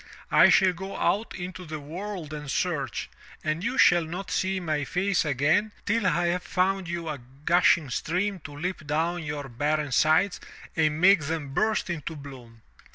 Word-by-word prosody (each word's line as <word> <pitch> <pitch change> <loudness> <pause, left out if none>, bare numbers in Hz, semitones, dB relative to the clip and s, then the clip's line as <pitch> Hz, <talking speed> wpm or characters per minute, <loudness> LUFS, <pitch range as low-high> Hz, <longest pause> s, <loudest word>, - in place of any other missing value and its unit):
I - - +7
shall 185 -1 +5
go 190 +3 -7
out 215 +3 0
into 180 0 -6
the 155 -2 -6
world 170 +1 -6
and 150 -1 -6
search, 140 -5 -2 0.4
and 155 +3 -1
you 260 - -1
shall 175 -1 +6
not 180 +4 -6
see 190 0 0
my 155 -4 -1
face 185 +6 0
again 155 +10 +1
till 220 -1 +1
I 175 0 +2
have 180 +1 0
found 190 0 0
you 170 -1 -4
a 150 -3 -4 0.3
gushing 170 -4 +4
stream 185 +8 -1
to 145 - -8
leap 170 -1 -4
down 165 +4 0
your 150 -3 -5
barren 145 +3 -1
sides 155 +8 +3 0.4
and 155 -1 +1
make 180 -3 +5
them 145 -3 -4
burst 215 +6 +1
into 160 -1 -5
bloom!" 125 -6 -12
165 Hz, 170 wpm, -26 LUFS, 150-185 Hz, 0.4 s, I